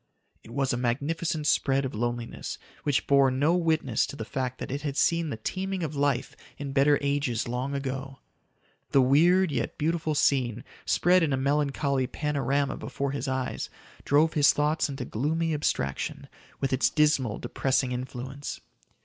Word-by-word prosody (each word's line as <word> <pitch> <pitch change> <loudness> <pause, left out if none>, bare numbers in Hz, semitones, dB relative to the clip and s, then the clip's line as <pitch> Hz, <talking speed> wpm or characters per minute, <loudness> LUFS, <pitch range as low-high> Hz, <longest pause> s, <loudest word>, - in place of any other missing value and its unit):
It - - -14
was 135 +2 0
a - - 0
magnificent 150 +6 -1
spread 135 -2 +2
of 130 - -4
loneliness 120 +1 -3 0.2
which 145 -3 0
bore 140 -1 +5
no 140 +6 +2
witness 160 -9 +1
to - - -7
the 110 - -5
fact 130 0 -3
that - - -6
it 140 +2 -3
had 145 -1 -3
seen 165 -1 +2
the 115 - -4
teeming 190 - -3
of 155 -2 -3
life 140 -3 0 0.2
in 140 -1 -5
better 140 +1 +4
ages 140 -5 0
long 125 +4 -2
ago. 135 0 -4 0.8
The 135 - +6
weird, 170 +7 +4
yet - - -2
beautiful 160 0 0
scene, 125 -5 +1 0.2
spread 180 +1 +4
in 155 -4 +1
a - - +1
melancholy 140 -1 +1
panorama 140 -1 -1
before 140 -1 -3
his 140 +1 -3
eyes, 130 -1 -2 0.3
drove 155 +3 +3
his 145 -2 +5
thoughts 150 +1 +1
into 135 -2 -5
gloomy 160 +8 -1
abstraction 70 - -2 0.3
with 135 -1 -1
its 130 - +3
dismal, 150 -8 +2
depressing 130 -1 0
influence. 130 +2 -5
140 Hz, 160 wpm, -27 LUFS, 130-150 Hz, 0.8 s, The